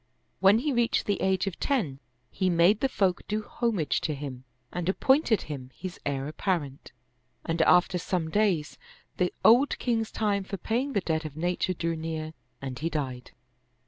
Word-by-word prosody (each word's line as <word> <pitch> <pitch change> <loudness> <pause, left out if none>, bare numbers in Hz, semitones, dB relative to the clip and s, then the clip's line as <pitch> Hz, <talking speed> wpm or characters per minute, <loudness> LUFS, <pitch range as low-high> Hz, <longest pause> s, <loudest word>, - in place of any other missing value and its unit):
When 195 +3 +6
he 280 +4 0
reached 240 -1 +1
the 205 -2 0
age 190 0 +2
of 195 -3 -4
ten, 185 - 0 0.3
he 185 -1 0
made 175 +5 +4
the 270 - +1
folk 190 -7 +1
do 215 +1 -1
homage 210 - -1
to 155 - -1
him 135 -3 -7 0.3
and 175 0 -2
ap 190 - -1
pointed 265 -5 +3
him 135 -4 -7
his 185 0 -7
heir 135 -1 -2
apparent, 150 -4 -3 0.5
and 165 0 0
after 180 +2 +4
some 170 -2 -2
days, 190 -7 +1 0.4
the 180 -1 +1
old 245 +6 +6
king's 225 -3 0
time 205 -2 0
for 195 +1 -5
paying 250 +9 -1
the 200 - +1
debt 160 -2 -1
of 155 -1 -7
nature 180 +2 0
drew 165 -1 -2
near 160 -1 -4 0.3
and 130 -2 -5
he 165 - -1
died. 130 -6 -4
180 Hz, 175 wpm, -28 LUFS, 155-210 Hz, 0.5 s, When